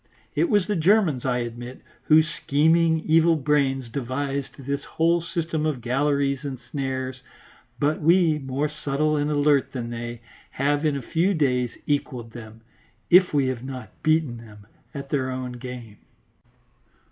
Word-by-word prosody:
It 340 - +1
was 205 -3 +3
the 210 - -1
Germans, 170 - +3
I 125 -1 +1
admit, 120 +2 -8 0.2
whose 155 0 +5
scheming, 160 +2 +2
evil 165 +1 +4
brains 135 -3 +1
devised 135 +3 -3
this 140 +1 -4
whole 170 +1 +1
system 165 -2 -3
of 155 -4 -1
galleries 140 +3 0
and 135 -2 -4
snares; 130 -2 -3 0.6
but 150 +2 +1
we, 165 -1 +4
more 135 +2 -2
subtle 150 0 -1
and 145 0 0
alert 145 -2 +2
than 120 -3 -4
they, 120 0 -6 0.3
have, 145 +3 0
in 150 - 0
a 135 - -6
few 175 +9 +1
days, 125 -5 +1 0.2
equalled 130 -5 -2
them, 110 -1 -11 0.5
if 180 +1 +7
we 140 -2 +2
have 125 -2 -4
not 130 -1 -7
beaten 155 -6 +1
them, 105 -3 -14 0.3
at 140 -2 -8
their 135 -3 0
own 130 -1 -4
game. 120 -3 -8
140 Hz, 150 wpm, -24 LUFS, 130-155 Hz, 0.6 s, if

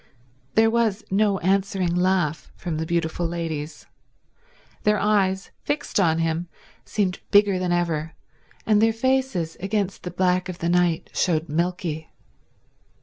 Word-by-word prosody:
There 225 0 +5
was 225 -3 +1
no 200 0 +3
answering 190 -1 +1
laugh 180 -3 0
from 170 -4 -4
the 160 +1 -3
beautiful 170 0 -1
ladies. 160 -3 -4 1.0
Their 210 0 +3
eyes, 195 -2 +1
fixed 290 -6 -1
on 165 -4 +3
him, 165 +1 -1 0.4
seemed 190 -4 -1
bigger 200 -2 +4
than 180 -1 -1
ever, 165 -2 -1 0.5
and 210 -1 +4
their 225 0 +4
faces 255 -9 0
against 195 0 -2
the 180 - -5
black 180 +1 +1
of 180 - -5
the 170 - -2
night 175 -2 +1
showed 165 -2 0
milky. 165 -1 -2
180 Hz, 135 wpm, -24 LUFS, 165-205 Hz, 1.0 s, There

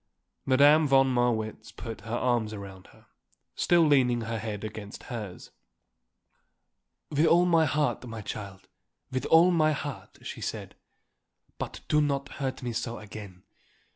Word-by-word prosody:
Madame 145 +4 +6
von 135 -1 +4
Marwitz 115 -3 -1
put 115 +1 -8
her 115 +1 -4
arms 120 -3 0
around 95 -2 -9
her, - - -21 0.5
still 175 -1 +3
leaning 125 -5 +3
her 115 0 -3
head 105 -1 -5
against 105 -1 -7
hers. 105 -6 -7 1.6
"With 150 +2 +3
all 175 +1 +5
my 165 -2 +4
heart, 150 -1 0
my 115 -1 -6
child, 100 -2 -7 0.4
with 130 0 -2
all 170 +3 +6
my 155 -3 +3
heart," 145 -2 -6
she - - -7
said. - - -5 0.9
"But - - -5
do 150 - +3
not 140 -1 -1
hurt 130 -1 -3
me 120 -1 -3
so 115 +1 -3
again. 100 -3 -10
120 Hz, 140 wpm, -28 LUFS, 110-145 Hz, 1.6 s, Madame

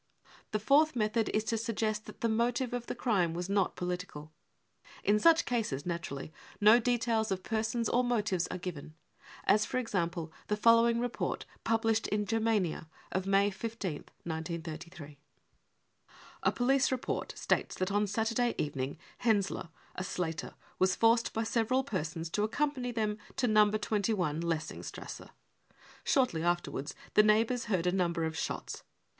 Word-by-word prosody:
The 215 - 0
fourth 285 +7 +4
method 220 0 +1
is 215 - +1
to 225 0 -1
suggest 215 -1 -2
that - - -11
the 230 - +2
motive 235 +2 0
of 245 -1 -3
the - - -3
crime 190 -10 +1
was 175 +1 -3
not 200 -2 +1
political; 180 -4 -5 0.7
in 210 +2 +3
such 330 +6 +5
cases, 215 - -1
naturally, 165 -4 -4 0.3
no 215 +3 +7
details 230 -2 +1
of 190 -1 -2
persons 225 +1 -1
or 250 - +2
motives 210 -7 0
are - - -4
given, 160 -4 -7 0.5
as 210 +1 +4
for - - -2
example 170 -8 -2
the 210 - 0
following 230 +1 +5
report 245 0 -2 0.2
published 225 -1 +1
in 210 0 0
Germania 215 -7 0 0.2
of 190 +1 -1
May 200 +1 +4
15th, 200 -6 -5 0.2
1933: 165 -1 -5
£< 145 -1 -16 1.2
A - - +3
police 270 +2 +2
report 255 -1 -3
states - - 0
that 185 +1 -1
on 205 +1 +2
Saturday 230 +3 0
evening 140 -1 -2 0.2
Henseler, 200 -6 +1 0.2
a 180 - -4
slater, 165 -4 -3 0.2
was 185 0 +3
forced 230 +1 +3
by 225 - -1
several 230 +3 +1
persons 165 - -3
to 205 - 0
accompany 255 +2 -1
them 215 -2 -1 0.2
to 265 - +1
No. 215 -1 +5
2 215 0 0 0.3
s 155 +2 -2
Lessingstrasse. 165 -2 -4 0.7
Shortly 250 - +2
afterv/ards 175 -4 -1 0.2
the - - +7
neighbours 225 +3 +3
heard 190 -6 0
a 180 - +3
number 170 -3 0
of 160 0 -2
shots. - - -4
210 Hz, 150 wpm, -31 LUFS, 175-230 Hz, 1.2 s, no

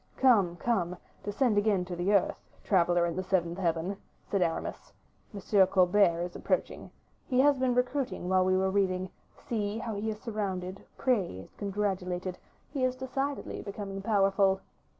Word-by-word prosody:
"Come, 205 -10 +4
come, 180 -4 -1 0.3
descend 205 +1 +2
again 205 -3 +1
to 180 -1 -5
the 175 +3 0
earth, 200 -2 +2 0.2
traveler 175 -2 +3
in 170 -1 -2
the 185 - -1
seventh 180 -2 0
heaven," 175 +2 -1 0.3
said 200 - -1
Aramis; 165 -2 -2 0.4
"M. 200 -1 +3
Colbert 185 -2 +4
is 175 0 -6
approaching. - - -2 0.4
He 255 -1 +1
has 285 -1 +4
been 255 -1 +2
recruiting 250 -5 -1
while 185 0 +3
we 185 0 +3
were 190 0 +1
reading; 185 -2 0 0.3
see, 210 -2 -3
how 225 -1 -4
he 210 +2 -2
is 215 -1 -4
surrounded, 195 -4 -4
praised, 190 - -1
congratulated; 190 -3 -2 0.3
he 275 -3 -2
is 255 0 +1
decidedly 270 +2 -3
becoming 200 -1 -6
powerful." 195 -2 +3
195 Hz, 150 wpm, -30 LUFS, 180-220 Hz, 0.4 s, Come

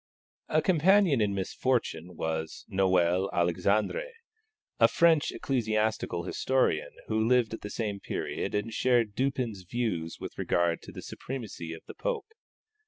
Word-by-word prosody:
A - - +2
companion 185 - +4
in 100 -1 +1
misfortune 95 -4 -1
was 80 0 -3
Noel 95 0 +2
Alexandre, 100 - +1 0.7
a - - +8
French 165 -3 +4
ecclesiastical 110 -7 -1
historian 130 -6 +1 0.2
who 110 0 0
lived 125 -2 +3
at 110 - -5
the 105 - -6
same 105 -2 -3
period - - -3
and 105 +2 -2
shared 120 -4 +2
Dupin's 125 -4 -1
views 90 -5 -2
with - - -8
regard 85 -1 +1
to - - -10
the - - -9
supremacy 110 -10 -6
of 80 - -8
the - - -9
Pope. 480 -3 -3
110 Hz, 135 wpm, -29 LUFS, 90-130 Hz, 0.7 s, a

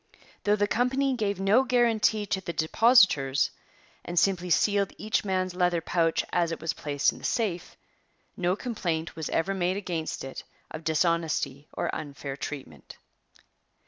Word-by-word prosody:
Though 205 0 +4
the 205 0 +1
company 260 +5 +1
gave 205 -5 -1
no 200 +7 +4
guarantee 230 -4 +2
to 190 -1 -2
the 170 -2 -5
depositors 160 - +4 0.5
and 175 - -6
simply 180 0 +2
sealed 200 +4 +2
each 215 - -1
man's 185 -2 -1
leather 180 -1 +1
pouch 165 0 0
as 170 -1 +2
it 165 - -4
was 165 - -2
placed 145 -1 0
in - - -12
the - - -17
safe, 190 -7 -2 0.6
no 180 0 0
complaint 175 -9 -3
was 160 -2 -4
ever 190 +4 0
made 185 0 0
against 170 -5 -4
it 135 0 -7 0.3
of 155 +1 -7
dishonesty 160 -3 0
or - - -3
unfair 140 -2 -5
treatment. 130 - -8
180 Hz, 150 wpm, -27 LUFS, 160-205 Hz, 0.6 s, Though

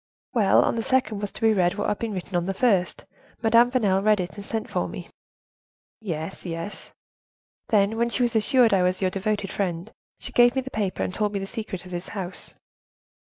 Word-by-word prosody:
"Well, 215 -6 +4
on - - 0
the - - 0
second 240 -4 0
was 205 - -3
to - - -11
be 225 -1 +4
read 180 -3 +2
what 205 - -2
had 210 - -1
been 225 -2 -3
written 185 0 -5
on 175 0 0
the 195 - -2
first; 195 -8 +1 0.4
Madame 230 +2 +5
Vanel 205 -7 +2
read 210 0 +3
it, 180 -1 -3
and 205 - -8
sent 220 +2 -3
for - - -1
me." - - -8 0.9
"Yes, 170 -4 -5
yes." 170 +3 -6 0.8
"Then, 210 0 +3
when 235 +1 +1
she 245 +2 0
was 235 -1 0
assured 235 +1 +4
I 190 - +4
was 180 +1 +1
your 185 -2 +1
devoted 200 +1 -2
friend, 175 -3 -3 0.3
she - - -9
gave 240 +1 +5
me 265 - +1
the 265 - -8
paper, 205 -3 -2
and - - -3
told 210 0 -1
me - - -1
the 195 - -3
secret 205 -4 -6
of 180 - -11
this 175 +1 -5
house." 185 -1 -5
205 Hz, 215 wpm, -25 LUFS, 185-225 Hz, 0.9 s, Madame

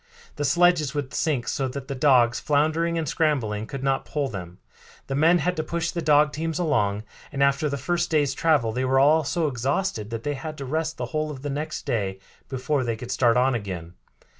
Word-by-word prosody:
The 145 - -1
sledges 155 -1 +3
would 145 -3 -3
sink 145 -7 0
so 135 - -1
that 135 +1 -6
the - - -3
dogs, 125 -4 +4
floundering 160 +3 +1
and 160 -2 -2
scrambling, 125 -10 0
could 135 +1 -6
not 135 -1 +1
pull 145 -3 -2
them. 90 -3 -7 0.5
The 135 - -4
men 160 +5 +4
had 180 +2 0
to 155 - 0
push 170 +1 -2
the 170 - -3
dog 150 -1 +4
teams 160 0 -2
along, 105 - 0 0.3
and 140 -1 0
after 140 +2 +2
the 140 - -2
first 175 +6 -1
day's 145 -4 +2
travel 145 -7 +2
they 125 +3 -2
were 130 +1 +3
all 155 +3 +5
so 165 +3 -1
exhausted 130 - -1
that 115 -1 -5
they 145 - -1
had 155 +2 -6
to 140 - -6
rest 160 +4 -2
the - - -3
whole 155 0 -1
of 140 -2 -8
the 145 - -3
next 155 +2 -4
day 95 -4 -1 0.3
before 135 +1 -1
they 115 -2 -1
could 120 +2 -7
start 120 -2 +3
on 130 +1 +3
again. 90 -7 -5
140 Hz, 215 wpm, -25 LUFS, 125-155 Hz, 0.5 s, all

